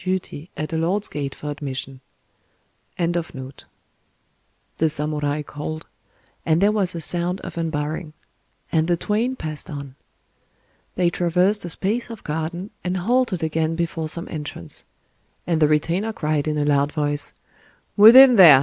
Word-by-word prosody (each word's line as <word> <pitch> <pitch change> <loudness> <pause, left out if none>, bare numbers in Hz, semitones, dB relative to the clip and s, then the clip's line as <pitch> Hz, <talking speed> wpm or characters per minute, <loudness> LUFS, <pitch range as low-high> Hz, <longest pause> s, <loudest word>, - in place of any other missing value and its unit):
_" 150 -6 -3 2.8
the 160 - +2
samurai 150 0 -2
called,—and 155 +2 -5
there 200 +2 +4
was 195 -4 0
a - - -3
sound 175 +3 +3
of - - -8
unbarring; 155 -1 -3 0.6
and 160 -1 +2
the 175 -1 +2
twain 225 +8 -1
passed 155 - -5
on. 140 -3 -7 1.0
They 175 -1 +2
traversed 180 +4 +1
a - - -5
space 210 +9 -1
of 230 -3 -9
garden, 160 +6 -4
and 180 +1 -1
halted 225 -2 +1
again 160 +1 0
before 165 -1 -2
some 170 +2 -3
entrance; 145 - -5 0.6
and 165 -2 0
the 150 - +6
retainer 165 +8 0
cried 155 -5 -1
in 150 0 -1
a 145 - 0
loud 145 0 +2
voice, 145 -1 -2 0.6
"Within 245 +4 +9
there! 160 -8 +10
160 Hz, 120 wpm, -22 LUFS, 150-185 Hz, 2.8 s, there